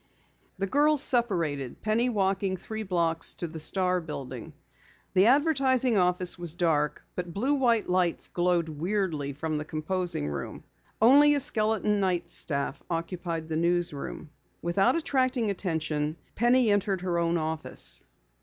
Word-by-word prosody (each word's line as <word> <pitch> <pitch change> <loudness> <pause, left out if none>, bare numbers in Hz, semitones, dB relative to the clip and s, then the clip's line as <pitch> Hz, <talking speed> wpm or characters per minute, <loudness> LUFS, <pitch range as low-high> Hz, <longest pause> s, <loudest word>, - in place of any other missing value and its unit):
The 195 - -1
girls 290 +6 +3
separated, 170 - 0
Penny 225 +3 +1
walking 195 -3 0
three 220 +4 -6
blocks 170 -5 -1
to 170 - -4
the 160 0 -8
Star 180 +3 0
building. 135 -6 -7 0.6
The 190 +2 +5
advertising 265 -3 +3
office 180 -1 +1
was 170 -2 -3
dark, 160 -4 0
but 175 -2 -6
blue 255 +8 +1
white 240 -6 +2
lights 180 -1 0
glowed 175 -1 0
weirdly 160 -3 -2
from 155 +2 -3
the - - -4
composing 160 - -3
room. 75 -1 -6 0.4
Only 285 +6 +6
a - - +1
skeleton 215 -5 +2
night 180 -3 -1
staff 140 -3 -2
occupied 165 -1 -4
the 160 -1 -2
newsroom. 170 -3 -1 0.3
Without 195 +8 +2
attracting 255 -8 0
attention, 160 -5 -2 0.2
Penny 240 0 +3
entered 200 -2 0
her 175 -2 -1
own 170 0 +1
office. 160 0 +1
180 Hz, 135 wpm, -27 LUFS, 160-220 Hz, 0.6 s, Only